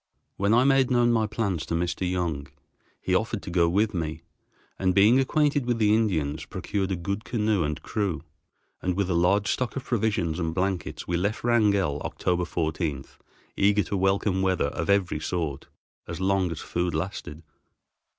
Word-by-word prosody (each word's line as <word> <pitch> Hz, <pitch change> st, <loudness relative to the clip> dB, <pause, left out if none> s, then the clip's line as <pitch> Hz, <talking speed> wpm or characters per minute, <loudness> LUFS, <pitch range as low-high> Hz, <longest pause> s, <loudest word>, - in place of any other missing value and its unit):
When 100 Hz, +1 st, +1 dB
I 120 Hz, +3 st, +5 dB
made 135 Hz, -1 st, +4 dB
known 120 Hz, -1 st, +3 dB
my 110 Hz, -2 st, +2 dB
plans 100 Hz, -7 st, -2 dB
to 85 Hz, -, -1 dB
Mr. 90 Hz, +2 st, -1 dB
Young, 85 Hz, -6 st, -2 dB, 0.5 s
he 95 Hz, -, -2 dB
offered 110 Hz, +2 st, 0 dB
to 90 Hz, -, -6 dB
go 85 Hz, -1 st, +3 dB
with 105 Hz, +5 st, +1 dB
me, 80 Hz, -2 st, -3 dB, 0.6 s
and, 95 Hz, -1 st, +1 dB
being 110 Hz, +6 st, +6 dB
acquainted 145 Hz, -1 st, +1 dB
with 120 Hz, -1 st, +1 dB
the 105 Hz, -2 st, +3 dB
Indians, 80 Hz, -10 st, 0 dB
procured 100 Hz, -2 st, -3 dB
a -, -, +1 dB
good 100 Hz, +5 st, -3 dB
canoe 105 Hz, -6 st, 0 dB
and 75 Hz, +1 st, -2 dB
crew, 100 Hz, -7 st, -2 dB, 0.6 s
and 90 Hz, -1 st, -1 dB
with 100 Hz, -2 st, 0 dB
a -, -, +2 dB
large 95 Hz, +4 st, +2 dB
stock 125 Hz, -3 st, -2 dB
of 135 Hz, -, -4 dB
provisions 100 Hz, -8 st, 0 dB
and 80 Hz, -1 st, -2 dB
blankets, 95 Hz, -2 st, -2 dB
we 85 Hz, -, 0 dB
left 100 Hz, +5 st, -1 dB
Wrangell 100 Hz, -10 st, +2 dB
October 90 Hz, -1 st, -1 dB
14, 80 Hz, -4 st, -2 dB, 0.5 s
eager 100 Hz, +1 st, +3 dB
to 90 Hz, -, -4 dB
welcome 95 Hz, 0 st, +1 dB
weather 95 Hz, -6 st, +1 dB
of -, -, -4 dB
every 100 Hz, -6 st, +2 dB
sort, 75 Hz, -4 st, -3 dB, 0.4 s
as 85 Hz, +1 st, -5 dB
long 95 Hz, -1 st, +1 dB
as 80 Hz, -2 st, -5 dB
food 85 Hz, -1 st, -2 dB
lasted. 80 Hz, -2 st, -5 dB
95 Hz, 175 wpm, -26 LUFS, 85-105 Hz, 0.6 s, being